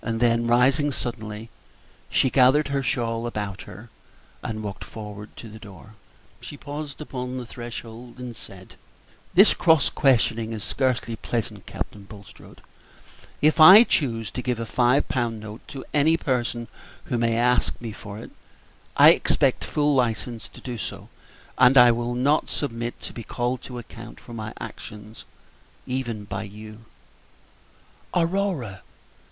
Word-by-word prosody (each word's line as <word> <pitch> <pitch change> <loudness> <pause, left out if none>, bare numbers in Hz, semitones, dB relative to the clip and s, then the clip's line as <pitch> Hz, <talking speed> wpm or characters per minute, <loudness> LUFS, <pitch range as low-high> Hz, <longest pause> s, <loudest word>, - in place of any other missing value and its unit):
Then, 115 0 +1
rising 130 +5 +3
suddenly, 115 -3 -5 0.6
she 130 - +2
gathered 135 +3 +4
her 140 0 0
shawl 115 -3 -1
about 105 -4 -4
her 105 +5 -12 0.5
and 110 -1 -5
walked 100 -2 -6
toward 105 -1 -8
the 110 -1 -10
door. 105 0 -13 0.5
She 145 - -9
paused 145 0 -7
upon 125 -3 -5
the 125 - -5
threshold 120 0 -9
and 125 -2 -7
said, 95 -3 -12 0.6
"This 195 +4 +7
cross 160 -5 +3
questioning 115 -4 +2
is 110 -2 -5
scarcely 125 -3 -1
pleasant, 110 -2 -4
Captain 100 -1 -6
Bulstrode. 100 -1 -14 0.8
If 155 +2 +4
I 185 +8 +11
choose 115 - -1
to 125 - -4
give 125 -2 -2
a 115 - -3
five 125 +4 +2
pound 120 -3 -1
note 105 +1 -9
to 135 -2 -8
any 155 +3 +4
person 120 -5 -2 0.4
who 120 - -2
may 115 -1 +1
ask 125 +1 +2
me 115 -2 -6
for 105 -1 -9
it, 110 - -10 0.7
I - - +10
expect - - +2
full 150 -1 +1
license 115 -4 -1
to - - -14
do 120 -3 -6
so, - - -6 0.5
and 130 +1 +6
I 125 -1 +9
will 120 +1 -2
not 140 +5 +2
submit 120 -4 -4
to - - -8
be 115 - -7
called 125 +3 -2
to 125 - -8
account 115 0 -10
for 120 - -12
my 110 -1 -5
actions 105 +1 -10 0.6
even 120 -5 -3
by 100 -1 -5
you." 105 +2 -10 1.3
"Aurora!" 170 - 0
120 Hz, 145 wpm, -24 LUFS, 110-130 Hz, 1.3 s, I